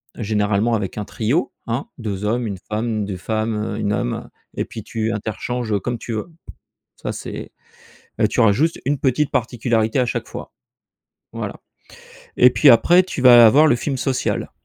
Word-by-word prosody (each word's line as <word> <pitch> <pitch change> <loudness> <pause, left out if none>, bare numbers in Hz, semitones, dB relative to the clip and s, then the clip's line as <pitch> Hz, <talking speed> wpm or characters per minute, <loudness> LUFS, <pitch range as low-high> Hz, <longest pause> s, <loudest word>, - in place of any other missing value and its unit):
généralement 105 0 0
avec 100 -3 -2
un 105 - -3
trio, 120 - -1 0.2
hein: 120 +4 -2
2 105 -4 -4
hommes, 115 +2 0
1 100 -2 -4
femme, 110 0 -2
2 100 -2 -5
femmes, 110 +3 -2
1 105 -1 -2
homme - - -3 0.3
et - - -2
puis - - -9
tu 110 0 -2
interchanges, 110 +2 -3
heu, 100 - +1
comme 120 +4 -3
tu 115 +1 -6
veux. 110 +10 -5 0.7
Ça - - -5
c'est, - - -7 0.7
heu, - - +4
tu - - -3
auras 110 - +6
juste 155 +10 0
une 140 0 0
petite 140 +2 +1
particularité 115 0 0
à 125 - +2
chaque - - -3
fois, - - -8 0.8
voilà. - - -5 0.8
Et 125 - +7
puis 140 +3 +4
après, 175 +10 +6
tu 185 -7 -5
vas 120 -2 +9
avoir 145 +8 +6
le 125 - +4
film 135 +3 -3
social, 130 0 -2
115 Hz, 175 wpm, -20 LUFS, 105-125 Hz, 0.8 s, vas